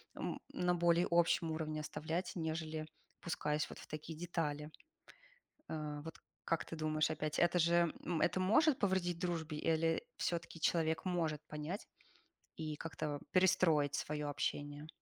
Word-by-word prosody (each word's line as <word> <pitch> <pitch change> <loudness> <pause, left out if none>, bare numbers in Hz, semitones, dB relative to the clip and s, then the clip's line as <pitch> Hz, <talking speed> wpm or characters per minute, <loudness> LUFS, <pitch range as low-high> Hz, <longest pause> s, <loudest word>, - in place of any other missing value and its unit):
м, - - -3
на 180 0 +2
более 170 0 +4
общем 170 -1 +4
уровне 155 -1 -2
оставлять, 165 +4 -3
нежели 160 -1 -2 0.3
опускаясь 150 -3 -1
вот - - -9
в - - -11
такие 155 +1 -6
детали. 155 -3 -2 1.0
Э, 150 -2 -3
вот 160 +1 -7 0.3
как 165 - 0
ты - - -6
думаешь, 155 -1 +1
опять, 155 -1 -1
это 175 +1 +4
же, 170 0 +4 0.3
это - - +3
может 260 - +5
повредить 185 -3 +1
дружбе 165 -3 -2
или 165 +1 +2
всё-таки 170 -1 -2
человек 160 -1 +2
может 165 -5 0
понять 150 +6 -4 0.7
и 155 -1 -3
как-то 150 -2 -3
перестроить 165 -6 +4
свое 150 0 -2
общение? 145 +1 -2
160 Hz, 135 wpm, -37 LUFS, 155-175 Hz, 1.0 s, может